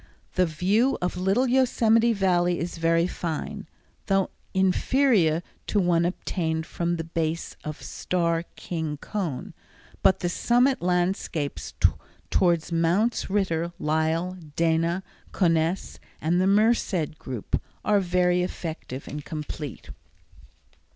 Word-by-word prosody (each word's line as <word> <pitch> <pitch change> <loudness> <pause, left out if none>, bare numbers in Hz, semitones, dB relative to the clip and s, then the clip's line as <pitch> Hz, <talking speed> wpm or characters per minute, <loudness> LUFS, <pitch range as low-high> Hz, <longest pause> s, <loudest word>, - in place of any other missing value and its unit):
The 185 -1 +3
view 200 - +2
of 180 0 -2
Little 195 +8 +2
Yosemite 235 -3 +3
Valley 180 -4 +2
is 170 0 -4
very 165 +1 +3
fine, 185 +4 -4 0.4
though 195 -1 +2 0.2
inferior 190 - +3 0.2
to 210 - +2
one 175 -2 +3
obtained 160 -2 -2
from 170 0 -1
the 165 - -3
base 165 0 -2
of 150 -1 -5
the - - -14
Starr 170 -2 0
King 160 -4 -4
Cone, 170 -4 -4 0.5
but 190 - +4
the 175 - 0
summit 245 +8 +2
landscapes 175 -4 -1 0.6
towards 170 -2 +2
Mounts 175 +9 +1
Ritter, 175 -4 0
Lyell, 160 +4 0 0.2
Dana, 165 +2 +1 0.3
Conness, 165 0 +1 0.2
and 175 +3 +1
the 185 - +3
Merced 200 -7 +2
Group, 125 -5 -3 0.2
are 210 -1 +4
very 180 -1 +2
effective 160 -6 -5
and 150 0 -6
complete. 150 -3 -6
175 Hz, 115 wpm, -26 LUFS, 165-195 Hz, 0.6 s, but